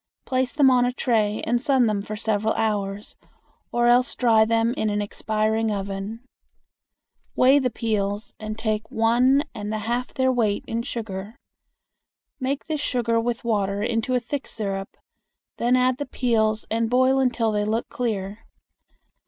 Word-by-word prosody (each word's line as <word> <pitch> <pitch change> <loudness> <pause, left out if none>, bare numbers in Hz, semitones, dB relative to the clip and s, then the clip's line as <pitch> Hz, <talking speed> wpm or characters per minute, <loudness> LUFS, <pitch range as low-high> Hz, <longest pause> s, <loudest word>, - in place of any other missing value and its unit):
Place 255 -1 0
them 280 -3 +4
on 250 -1 +4
a 245 - +1
tray 220 -4 0
and 240 +1 +1
sun 265 -2 +3
them 210 -2 0
for 215 +1 -6
several 215 0 0
hours, 205 -2 -2 0.6
or 240 0 +1
else 245 +2 +4
dry 225 -3 +4
them 230 +1 +1
in 215 -4 -1
an 205 0 -1
expiring 215 +2 -1
oven. 200 +2 -4 1.1
Weigh 265 +3 +5
the 255 -2 0
peels, 210 -3 -2
and 215 0 -5
take 215 -1 -2
once 250 +3 +3
and 210 0 -5
a 215 - -1
half 235 +4 -2
their 260 0 +1
weight 220 -5 0
in 230 +1 -2
sugar. 215 -3 -6 1.0
Make 270 +1 -2
this 305 -1 -3
sugar 235 -4 +1
with 240 0 -2
water 200 -3 0
into 235 +2 0
a - - +3
thick 270 +4 -5
syrup; 195 -3 -4 0.6
then 245 +2 +2
add 255 0 +2
the 285 - -3
peels 220 -4 0
and 225 0 0
boil 260 +2 +3
until 240 -4 +1
they 210 -1 0
look 220 +3 -1
clear. 210 -3 -4
225 Hz, 160 wpm, -24 LUFS, 215-250 Hz, 1.1 s, Weigh